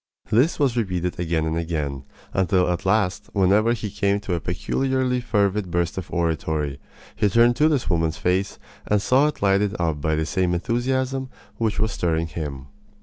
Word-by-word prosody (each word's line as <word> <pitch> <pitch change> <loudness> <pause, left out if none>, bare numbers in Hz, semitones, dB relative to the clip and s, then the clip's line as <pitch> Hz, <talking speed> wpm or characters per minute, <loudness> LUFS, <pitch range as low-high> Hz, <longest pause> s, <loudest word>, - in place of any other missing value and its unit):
This 125 +10 +3
was 135 -5 +1
repeated 90 -7 -2
again 80 -2 0
and 80 0 -1
again, 75 -5 -3 0.3
until 95 -1 +2
at 90 +2 -3
last 95 -3 +1
whenever 105 +4 +3
he 110 -3 -4
came 100 0 +1
to 100 -3 -3
a 85 - 0
peculiarly 130 +8 -1
fervid 100 -4 0
burst 85 +2 -1
of 95 -2 -6
oratory 80 -4 -1 0.4
he 105 - +2
turned 120 +3 +4
to 155 +1 +4
this 145 -5 0
woman's 80 -3 0
face 95 +2 0 0.3
and 105 - +3
saw 130 +8 +3
it 150 - -4
lighted 100 +1 +2
up 80 -4 -1
by 80 +1 +1
the 80 0 0
same 90 0 0
enthusiasm 130 +6 -1 0.3
which 110 -2 -1
was 110 0 +1
stirring 85 -3 0
him. 75 -5 -6
95 Hz, 175 wpm, -23 LUFS, 85-115 Hz, 0.4 s, turned